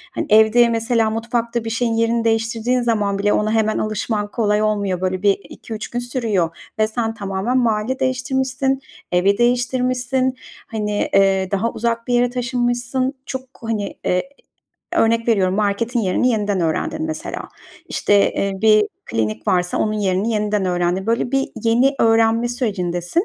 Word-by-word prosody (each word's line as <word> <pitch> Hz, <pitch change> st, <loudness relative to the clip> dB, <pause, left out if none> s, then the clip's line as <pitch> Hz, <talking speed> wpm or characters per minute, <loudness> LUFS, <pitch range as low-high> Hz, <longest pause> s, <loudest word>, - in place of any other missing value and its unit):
Hani, -, -, -1 dB
evde, 220 Hz, +2 st, +5 dB
mesela, 230 Hz, 0 st, +1 dB
mutfakta 230 Hz, +1 st, -2 dB
bir 225 Hz, -, -4 dB
şeyin 230 Hz, +1 st, 0 dB
yerini 230 Hz, +1 st, +1 dB
değiştirdiğin 225 Hz, +2 st, 0 dB
zaman 210 Hz, -4 st, 0 dB
bile 205 Hz, +1 st, +2 dB
ona 215 Hz, 0 st, +1 dB
hemen 220 Hz, -1 st, +1 dB
alışman 215 Hz, 0 st, -2 dB
kolay 210 Hz, -2 st, +1 dB
olmuyor. 200 Hz, -4 st, 0 dB
Böyle 185 Hz, 0 st, -1 dB
bir 200 Hz, -1 st, +3 dB
2-3 220 Hz, -2 st, -7 dB
gün 240 Hz, -, -3 dB
sürüyor 220 Hz, -9 st, -1 dB, 0.2 s
ve 215 Hz, -, +3 dB
sen 225 Hz, 0 st, -2 dB
tamamen 200 Hz, +4 st, -2 dB
mahalle 235 Hz, +1 st, 0 dB
değiştirmişsin, 265 Hz, +1 st, 0 dB, 0.3 s
evi 190 Hz, +3 st, +3 dB
değiştirmişsin. 250 Hz, +1 st, +1 dB, 0.3 s
Hani, 210 Hz, -2 st, -2 dB
eee, 195 Hz, -1 st, +3 dB
daha 205 Hz, +4 st, 0 dB
uzak 230 Hz, 0 st, -2 dB
bir 245 Hz, -, 0 dB
yere 245 Hz, 0 st, +3 dB
taşınmışsın. 245 Hz, +1 st, -1 dB
Çok, 260 Hz, -, -4 dB, 0.2 s
hani, 215 Hz, -3 st, -3 dB, 1.0 s
örnek 230 Hz, +1 st, +2 dB
veriyorum, 190 Hz, -5 st, +2 dB
marketin 215 Hz, +4 st, 0 dB
yerini 205 Hz, +5 st, +1 dB
yeniden 205 Hz, -5 st, 0 dB
öğrendin, 170 Hz, -, -1 dB
mesela. 315 Hz, 0 st, -5 dB, 0.4 s
İşte, 205 Hz, -1 st, +2 dB
eee, 200 Hz, 0 st, -1 dB
bir 215 Hz, -1 st, +6 dB, 0.2 s
klinik 110 Hz, -1 st, -2 dB
varsa 180 Hz, -1 st, +1 dB
onun 215 Hz, -, +1 dB
yerini 200 Hz, 0 st, 0 dB
yeniden 210 Hz, -2 st, 0 dB
öğrendin. 180 Hz, +2 st, 0 dB
Böyle 235 Hz, +2 st, 0 dB
bir 270 Hz, 0 st, +1 dB, 0.2 s
yeni 245 Hz, +5 st, +3 dB
öğrenme 225 Hz, +1 st, +3 dB
sürecindesin 200 Hz, -, -1 dB
225 Hz, 145 wpm, -20 LUFS, 205-245 Hz, 1.0 s, bir